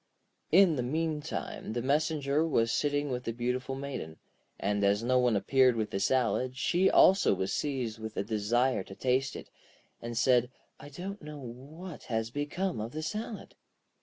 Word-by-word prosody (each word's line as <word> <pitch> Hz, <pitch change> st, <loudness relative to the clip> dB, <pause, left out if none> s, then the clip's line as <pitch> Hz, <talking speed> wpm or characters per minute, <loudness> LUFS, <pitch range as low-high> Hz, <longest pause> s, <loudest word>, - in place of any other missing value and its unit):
In 175 Hz, -3 st, +6 dB
the -, -, 0 dB
meantime 155 Hz, -2 st, -3 dB
the 120 Hz, -, -1 dB
messenger 150 Hz, +1 st, +1 dB
was 115 Hz, -8 st, +1 dB
sitting 145 Hz, -1 st, 0 dB
with 125 Hz, 0 st, -3 dB
the -, -, -1 dB
beautiful 125 Hz, +3 st, -2 dB
Maiden, 135 Hz, -, -6 dB, 0.4 s
and 100 Hz, +1 st, 0 dB
as 100 Hz, +2 st, +2 dB
no 125 Hz, +1 st, +3 dB
one 125 Hz, -3 st, +3 dB
appeared 130 Hz, +4 st, +4 dB
with 110 Hz, -2 st, -2 dB
the 95 Hz, -, -1 dB
salad, 130 Hz, +3 st, +1 dB
she 180 Hz, +9 st, +3 dB
also 190 Hz, -, +5 dB
was 95 Hz, +1 st, -2 dB
seized 125 Hz, -6 st, -2 dB
with 110 Hz, 0 st, -7 dB
a -, -, +1 dB
desire 115 Hz, +4 st, +1 dB
to 95 Hz, -, -10 dB
taste 130 Hz, +3 st, 0 dB
it, -, -, -9 dB, 0.5 s
and 115 Hz, 0 st, -5 dB
said: 125 Hz, -1 st, +3 dB, 0.3 s
'I 145 Hz, -, -10 dB
don't 190 Hz, +7 st, -7 dB
know 150 Hz, 0 st, -8 dB
what 145 Hz, +7 st, -9 dB
has 115 Hz, -1 st, -2 dB
become 145 Hz, -, -2 dB
of 115 Hz, +3 st, -5 dB
the 155 Hz, +1 st, -4 dB
salad.' 215 Hz, +5 st, -5 dB
130 Hz, 170 wpm, -30 LUFS, 115-150 Hz, 0.5 s, In